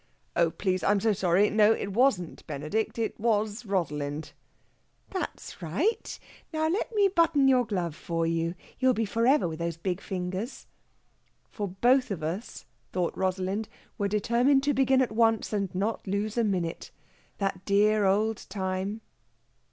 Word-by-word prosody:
"Oh, 170 -1 +4
please! 185 +1 -1
I'm 205 0 +3
so 220 +1 +2
sorry. 190 +1 +3
No 215 +1 +5
it 200 -3 -4
wasn't 215 -8 +1
Benedict 155 +12 -2
it 225 -1 -2
was 215 0 0
Rosalind." 150 -5 -2 0.8
"That's 375 - -5
right! 320 - -1 0.3
Now 315 -1 0
let 360 +8 -1
me 405 -1 +5
button 335 -7 +3
your 250 -3 +4
glove 180 -6 -2
for 165 0 -2
you. 165 +1 -1 0.2
You'll 255 -1 +3
be 225 - 0
for 230 +3 0
ever, 275 -7 +4
with 160 0 -6
those 170 -1 -2
big 180 +2 -3
fingers." 185 +5 -4 0.9
For 205 -2 -3
both 245 +8 +3
of 180 -6 -4
us, 180 +9 -5 0.3
thought 180 -2 -1
Rosalind, 190 +3 -1 0.3
were 200 - +1
determined 235 +7 +2
to 290 0 +2
begin 265 -1 +4
at 245 - -3
once 225 0 +2
and 200 -2 0
not 205 +3 -2
lose 205 +2 -1
a 235 - +2
minute. 180 -6 -2 0.5
That 195 -2 -2
dear 210 +1 +3
old 210 +3 +1
time 190 +2 -3
205 Hz, 155 wpm, -28 LUFS, 180-235 Hz, 0.9 s, No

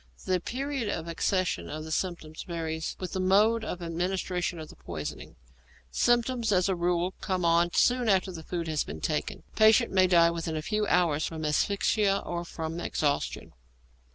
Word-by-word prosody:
The 185 -1 +1
period 265 +3 -3
of 165 -4 -3
accession 185 +2 -1
of 155 +1 -5
the 160 - -8
symptoms 160 -3 -3
varies 160 -2 -4
with 185 -2 -5
the 190 - -2
mode 210 +5 +3
of 180 -4 -5
administration 180 +1 -2
of 155 -1 -8
the - - -13
poison. 75 -3 -7 0.6
Symptoms, 240 - +2
as 185 -1 +3
a 190 - +1
rule, 175 +1 0
come 185 -2 -1
on 170 +1 +3
soon 245 -2 +3
after 190 -1 +2
food 170 +1 -4
has 155 -2 0
been 75 +1 -7
taken. - - -2
Patient 220 +2 +5
may 185 -1 +4
die 170 -2 +5
within 165 -1 -3
a 155 - -4
few 210 +3 -1
hours 165 -4 +2
from 160 -1 -5
asphyxia 200 +5 +2
or 175 0 -3
from 165 -1 -5
exhaustion. 145 -4 -2
180 Hz, 170 wpm, -28 LUFS, 165-200 Hz, 0.6 s, Patient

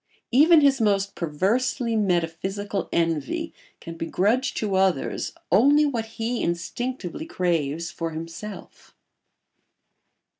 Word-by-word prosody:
Even 305 +6 +6
his 275 -3 +4
most 200 -2 +1
perversely 225 - 0
metaphysical 195 +1 -1
envy 165 - -1 0.3
can 165 - -8
begrudge 210 +10 0
to 210 -3 -2
others 190 -1 +1 0.2
only 285 +10 +5
what 240 -6 -1
he 230 +1 -1
instinctively 240 - -3
craves 165 - -1
for 165 +1 -4
himself. 165 +6 -9
200 Hz, 100 wpm, -24 LUFS, 170-245 Hz, 0.3 s, Even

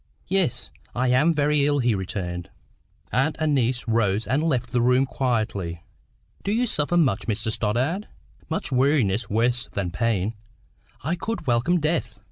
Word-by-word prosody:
"Yes; 190 -8 0 0.2
I 125 +1 +1
am 135 +7 +4
very 150 -1 +2
ill," 145 0 +2
he 120 -4 +2
returned. 90 -3 -4 0.6
Aunt 135 +5 +1
and 155 -1 +1
niece 125 -2 0
rose 110 -2 +1
and 135 +4 +1
left 130 -7 0
the 125 -1 +2
room 125 +2 +4
quietly. 110 -11 -2 0.6
"Do 200 - -1
you 235 +4 +2
suffer 175 -5 +1
much, 135 - +2
Mr 110 0 -1
Stoddart?" 130 - -1 0.4
"Much 160 - -2
weariness, 125 -5 +2
worse 120 +3 +1
than 95 -3 -2
pain. 110 0 0 0.7
I 155 +5 0
could 220 +1 -4
welcome 125 +8 +2
death." 150 -8 -1
125 Hz, 150 wpm, -24 LUFS, 110-150 Hz, 0.7 s, am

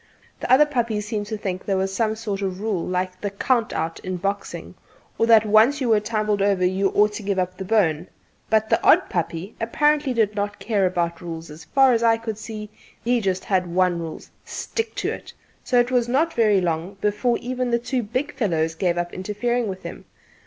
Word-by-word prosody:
The - - -3
other 275 +4 +7
puppies 235 -7 -1
seemed 210 -1 -3
to 215 0 -3
think 190 -3 -4
there 195 -2 0
was 190 0 -1
some 220 0 0
sort 210 -3 -4
of 190 -1 -3
rule 205 -5 -1
like 185 0 -2
the 205 - -1
'count 230 +4 0
out' 165 +1 -3
in 185 -1 -4
boxing, 200 +3 -4 0.5
or 230 - +3
that 225 -2 +6
once 220 +7 +5
you 255 -4 -1
were 220 -2 +5
tumbled 210 -1 -1
over 195 -2 +2
you 190 +2 +1
ought 210 +1 +4
to 210 - -5
give 200 -1 -1
up 185 0 -1
the 190 - -6
bone; 180 -6 +1 0.4
but 220 0 +3
the - - +2
odd - - +5
puppy 170 +3 -3
apparently 295 +4 +2
did 220 -4 +1
not 205 0 -3
care 205 -5 +1
about 170 -1 -2
rules; 165 -2 -7
as 150 0 -11
far 265 - +4
as 230 - +1
I 230 -1 +4
could 225 -2 -5
see, 215 -1 -7 0.3
he 240 - +1
had 230 - -3
just 185 -1 -1 0.2
one 180 0 +1
rule: 165 -2 -6 0.2
"Stick 450 -1 -4
to - - -1
it," - - -8 0.3
so 245 - +2
it 240 +1 +2
was 245 -2 +2
not 310 +7 +1
very 210 -4 +3
long 170 +3 -2
before 210 +4 +1
even 250 0 -3
the 235 - +2
two 245 +2 -2
big 255 +7 -3
fellows 165 -10 0
gave 175 +1 0
up 175 0 -2
interfering 225 +5 -1
with 190 -1 -6
him. - - -8
210 Hz, 215 wpm, -23 LUFS, 185-235 Hz, 0.5 s, other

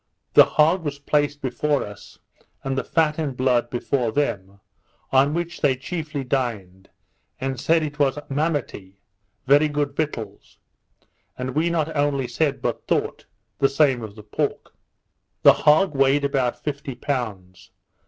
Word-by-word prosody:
The - - +9
hog 165 +4 +2
was 145 -2 -3
placed 145 0 0
before 140 +3 0
us, 105 -1 -12 0.5
and 135 0 -2
the 135 - -1
fat 160 -1 +1
and 140 -5 -3
blood 125 -2 +1
before 120 -1 -1
them, 100 -8 -2 0.5
on 140 +3 +3
which 170 0 -4
they 140 -4 +3
chiefly 155 +1 -5
dined, 110 -8 -3 0.5
and 135 -1 -3
said 165 0 +2
it 150 0 -5
was 140 -1 +2
Mamity, 140 - -3 0.5
very 145 +3 +5
good 145 -1 -2
victuals; 115 -10 -5 0.8
and 125 0 -4
we 160 +3 +1
not 160 -2 -1
only 145 -3 0
said, 135 +1 -1
but - - -3
thought, - - -1 0.3
the 135 - +4
same 135 -3 +2
of 105 -2 -8
the 105 - -12
pork. 105 - -3 0.7
The - - +9
hog 155 +4 +3
weighed 135 +1 +3
about 135 -3 -1
fifty 140 -3 -4
pounds. 100 -9 -5
140 Hz, 145 wpm, -23 LUFS, 120-150 Hz, 0.8 s, The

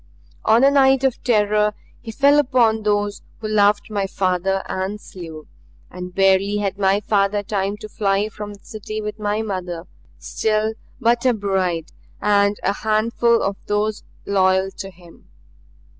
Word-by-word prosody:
On 230 +3 +5
a 275 - +6
night 270 -1 +4
of 265 -3 0
terror 210 -2 +2 0.3
he 225 - -7
fell 280 +5 +4
upon 245 -5 +2
those 205 -1 0 0.2
who 220 - -5
loved 205 0 +2
my 200 -2 -1
father 190 0 0
and 190 +3 -3
slew; 165 -6 -10 0.5
and 180 0 -8
barely 195 +1 +3
had 200 -1 -2
my 195 +1 +2
father 205 0 +1
time 200 0 -2
to 215 - -9
fly 200 -1 0
from 210 -1 -8
the 200 - -23
city 215 0 -6
with 210 0 -5
my 210 +1 -1
mother, 180 -5 -4 0.3
still 215 0 -1 0.3
but 235 0 +2
a 250 -2 +3
bride, 185 -5 -1 0.3
and 200 0 +2
a - - +1
handful 230 +2 +1
of 195 0 -1
those 210 +1 -1 0.2
loyal 190 -1 +2
to 195 0 -8
him. 175 -2 -18
205 Hz, 155 wpm, -21 LUFS, 195-215 Hz, 0.5 s, a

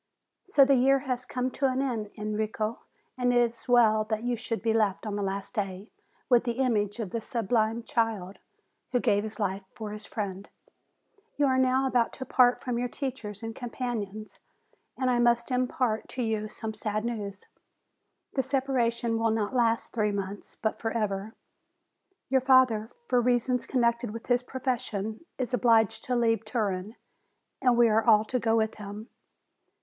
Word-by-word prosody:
So 295 -8 +5
the 275 - +4
year 270 +2 +5
has 250 -1 -2
come 255 +1 -2
to 270 +2 +1
an 260 0 0
end, 235 -6 -2
Enrico, 215 +1 -2 0.4
and 245 0 +3
it 240 -1 +3
is 235 - -20
well 225 -3 +5
that 215 +1 -2
you 245 0 0
should 230 -1 -4
be 225 -1 +2
left 215 -2 +1
on 210 -1 -3
the 205 - -2
last 195 +2 -3
day 195 -2 -4 0.4
with 245 -2 +5
the 240 -1 -1
image 230 -4 0
of 205 -5 -4
the 230 - -2
sublime 225 0 0
child, 220 -6 -1 0.5
who 245 - +4
gave 205 -3 +2
his 220 0 -7
life 195 -1 -1
for 215 -2 -6
his 210 +1 -8
friend. 200 -2 -5 0.9
You 290 - +3
are 260 -1 +3
now 260 +1 +3
about 245 -3 +1
to 260 - -6
part 250 -1 +4
from 245 -3 -2
your 245 - 0
teachers 240 -6 -5
and 225 0 -5
companions, 225 -4 -5 0.6
and 260 - 0
I 245 -1 +2
must 240 +1 +2
impart 250 -3 0
to 255 - -1
you 220 -1 -1
some 220 +1 -6
sad 215 0 -3
news. 205 -4 -4 0.9
The 270 - +2
separation 245 -4 0
will 225 0 +2
not 220 +1 -1
last 230 -2 +1
three 210 -2 +1
months, 200 0 -5
but 220 - -1
forever. 215 -2 -2 0.9
Your 265 0 +3
father, 255 -4 +4 0.2
for 250 - +2
reasons 250 0 +1
connected 235 -2 +1
with 230 +2 -7
his 245 -1 +2
profession, 240 -4 -3
is 255 -1 -3
obliged 225 -2 +3
to 250 - 0
leave 230 -1 +2
Turin, 215 -2 -2 0.7
and 250 -2 +4
we 240 -1 +6
are 220 0 +3
all 215 -2 +5
to 250 +3 -1
go 225 -1 +2
with 220 -1 +1
him. 210 +2 -7
230 Hz, 175 wpm, -28 LUFS, 215-250 Hz, 0.9 s, we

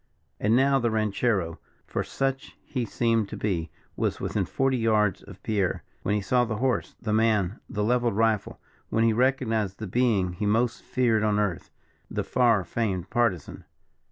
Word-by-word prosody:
And 110 +3 +3
now 135 +1 +4
the 120 -1 +1
ranchero 105 -5 0 0.3
for - - -2
such 135 -1 -3
he 125 -4 -3
seemed 115 -2 0
to - - -6
be 85 -6 -1 0.3
was - - -1
within - - -1
forty 135 -1 0
yards 110 -4 +2
of - - -14
Pierre, 100 -4 0 0.2
when 105 - 0
he 105 - 0
saw 125 +6 +2
the 115 -2 -2
horse, 130 +3 -1
the 110 -2 -2
man, 110 -2 +2
the 105 -5 -2
levelled 120 -1 +1
rifle 110 -1 +1 0.3
when 115 - +2
he 115 -1 +4
recognized 115 -5 +1
the 110 - -5
being 100 -4 +1
he 105 +4 -2
most 115 +3 +1
feared 120 -4 +1
on 105 -1 +2
earth 105 -5 -1 0.4
the - - -2
far 115 -6 +3
famed 95 -4 -2
Partisan. 115 - 0
110 Hz, 170 wpm, -26 LUFS, 105-120 Hz, 0.4 s, now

